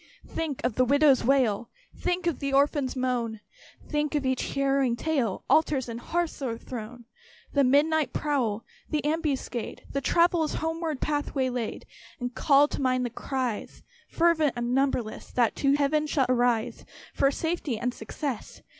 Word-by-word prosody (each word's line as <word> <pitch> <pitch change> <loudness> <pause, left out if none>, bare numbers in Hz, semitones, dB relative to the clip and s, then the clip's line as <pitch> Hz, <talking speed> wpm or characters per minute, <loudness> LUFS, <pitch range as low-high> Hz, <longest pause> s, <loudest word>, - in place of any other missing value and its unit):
Think 310 -5 -3
of 245 -2 -1
the 255 - +5
widow's 280 +1 +4
wail, 240 -4 +2 0.3
Think 355 0 -1
of 340 -4 0
the 275 -1 -2
orphan's 280 -1 +2
moan! 245 -4 -1 0.5
Think 300 0 -1
of 290 -2 0
each 260 -1 -1
harrowing 275 -3 +2
tale, 250 -6 -1
Altars 295 -5 +3
and 230 0 -5
hearths 340 +3 -2
o'erthrown! 240 -1 -6 0.5
The 280 - +4
midnight 290 +1 +3
prowl 245 -8 -1 0.2
the 300 -1 -1
ambuscade 295 -6 -2
The 275 - -1
traveller's 335 0 +2
homeward 325 -2 -2
path 295 -1 -1
waylaid! 250 -4 -2 0.3
And 245 -1 -4
call 285 +2 +4
to - - -4
mind 255 -1 +1
the 240 - -3
cries, 255 -3 -4 0.3
Fervent 330 -4 +3
and 240 0 -2
numberless, 260 -4 -1
That 240 -3 +2
shall 275 -1 +2
to - - +3
Heaven 300 +2 +1 0.2
arise 245 -3 +1 0.3
For 275 - +3
safety 320 -4 -2
and 245 +3 -2
success. 250 +2 -6
275 Hz, 150 wpm, -27 LUFS, 245-300 Hz, 0.5 s, the